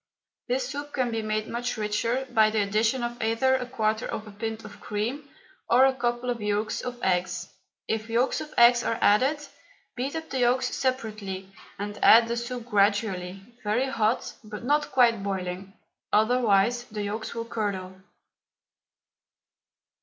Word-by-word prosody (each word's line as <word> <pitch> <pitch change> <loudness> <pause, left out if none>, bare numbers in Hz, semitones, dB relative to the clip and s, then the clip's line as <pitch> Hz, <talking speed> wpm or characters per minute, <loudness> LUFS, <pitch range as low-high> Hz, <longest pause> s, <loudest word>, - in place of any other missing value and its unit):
This 250 +1 0
soup 290 +1 -6
can 255 -3 0
be 225 -1 -1
made 215 0 -2
much 245 0 -3
richer 230 +5 -1
by 220 -2 +5
the 215 -1 +1
addition 220 +5 +1
of 240 0 -4
either 230 +4 +2
a 255 -1 0
quarter 220 -3 -1
of 215 - -5
a 210 - -10
pint 225 +2 -5
of - - -11
cream 240 +8 -3 0.4
or 250 +3 +6
a 270 - +3
couple 240 0 -1
of 235 -2 -4
yolks 210 +1 -1
of 245 -1 -6
eggs. 180 -1 0 0.4
If 220 0 -2
yolks 240 +3 +1
of 300 - -8
eggs 240 0 +7
are 225 - -1
added, 260 +9 +4 0.6
beat 265 +5 -3
up 320 0 -6
the 265 - -1
yolks 250 +1 +2
separately 215 -7 -3 0.3
and 205 +1 -5
add 230 +1 +8
the 235 - -1
soup 240 0 -5
gradually, 200 -3 0 0.2
very 235 +6 +1
hot, 225 -2 0
but 215 +1 -8
not 290 +3 +1
quite 235 -5 +4
boiling, 190 -1 -4 0.4
otherwise 230 +1 +3
the 210 -3 -5
yolks 215 +3 -4
will 230 0 -3
curdle. 195 -5 -4
225 Hz, 160 wpm, -26 LUFS, 210-245 Hz, 0.6 s, add